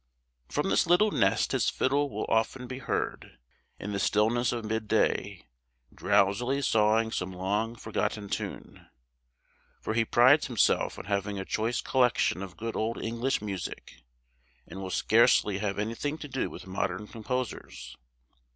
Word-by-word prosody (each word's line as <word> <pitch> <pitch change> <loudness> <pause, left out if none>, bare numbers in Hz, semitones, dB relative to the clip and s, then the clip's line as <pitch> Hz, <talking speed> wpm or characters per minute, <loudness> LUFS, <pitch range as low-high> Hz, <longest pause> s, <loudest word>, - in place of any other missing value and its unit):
From - - -1
this - - +3
little 205 +5 +4
nest - - +2
his - - +2
fiddle 140 +2 +1
will - - -3
often 115 +3 0
be 130 +1 -6
heard, 130 - -3 0.4
in 105 - -5
the 100 - -2
stillness 110 +5 +2
of 115 -2 -4
mid 110 0 -2
day, - - 0 0.5
drowsily 120 +8 +1
sawing 110 -1 +3
some 90 -2 -3
long 100 +5 -2
forgotten 110 -2 -3
tune; - - -6 0.9
for 110 - -3
he 115 0 +3
prides 130 +6 +5
himself 120 -6 +1
on - - -8
having 100 0 -2
a 95 - -4
choice 115 +4 -1
collection 125 -7 +2
of 95 -2 -8
good 115 +1 -4
old 115 +2 -1
English 115 +1 -1
music, 100 -4 -6 0.6
and 95 - -9
will 95 - -5
scarcely 105 0 +3
have 100 -1 -2
anything 115 +8 -2
to 150 - -8
do 130 -1 -2
with - - -10
modern 95 +1 -3
composers. 120 +3 -5
110 Hz, 150 wpm, -28 LUFS, 100-125 Hz, 0.9 s, prides